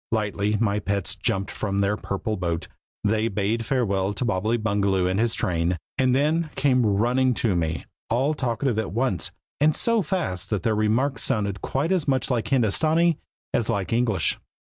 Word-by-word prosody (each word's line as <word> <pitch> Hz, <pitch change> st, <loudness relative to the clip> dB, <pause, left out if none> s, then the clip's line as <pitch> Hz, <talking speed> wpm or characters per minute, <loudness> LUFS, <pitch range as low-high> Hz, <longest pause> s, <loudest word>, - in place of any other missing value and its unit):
Lightly 105 Hz, -1 st, 0 dB
my 105 Hz, -2 st, +1 dB
pets 100 Hz, -2 st, -2 dB
jumped 95 Hz, +1 st, -1 dB
from 100 Hz, -2 st, -2 dB
their 100 Hz, +1 st, +2 dB
purple 105 Hz, +2 st, -3 dB
boat; 85 Hz, -3 st, -2 dB, 0.4 s
they 110 Hz, +1 st, +2 dB
bade 105 Hz, +2 st, -1 dB
farewell 100 Hz, -6 st, 0 dB
to 110 Hz, -, -2 dB
Bobbily 110 Hz, +1 st, +1 dB
Bungaloo 100 Hz, -4 st, +1 dB
and 95 Hz, +2 st, +1 dB
his 115 Hz, 0 st, +1 dB
train, 85 Hz, 0 st, 0 dB, 0.2 s
and 130 Hz, -1 st, +2 dB
then 155 Hz, +4 st, +1 dB
came 130 Hz, -2 st, +3 dB
running 120 Hz, +5 st, +2 dB
to 110 Hz, -5 st, +1 dB
me, 80 Hz, -1 st, -1 dB, 0.2 s
all 130 Hz, +6 st, +2 dB
talking 125 Hz, -3 st, -1 dB
at 110 Hz, -, -2 dB
once, 115 Hz, -4 st, -1 dB, 0.3 s
and 150 Hz, +1 st, +4 dB
so 230 Hz, -2 st, +2 dB
fast 155 Hz, -, -2 dB
that 105 Hz, -3 st, -1 dB
their 115 Hz, -2 st, +2 dB
remarks 115 Hz, +4 st, +1 dB
sounded 100 Hz, -3 st, 0 dB
quite 145 Hz, +6 st, -1 dB
as 180 Hz, -6 st, +1 dB
much 130 Hz, -1 st, +1 dB
like 115 Hz, -4 st, 0 dB
Hindostanee 155 Hz, +8 st, +2 dB, 0.3 s
as 120 Hz, -4 st, +1 dB
like 100 Hz, -1 st, -1 dB
English. 115 Hz, -8 st, +1 dB
110 Hz, 170 wpm, -24 LUFS, 100-130 Hz, 0.4 s, and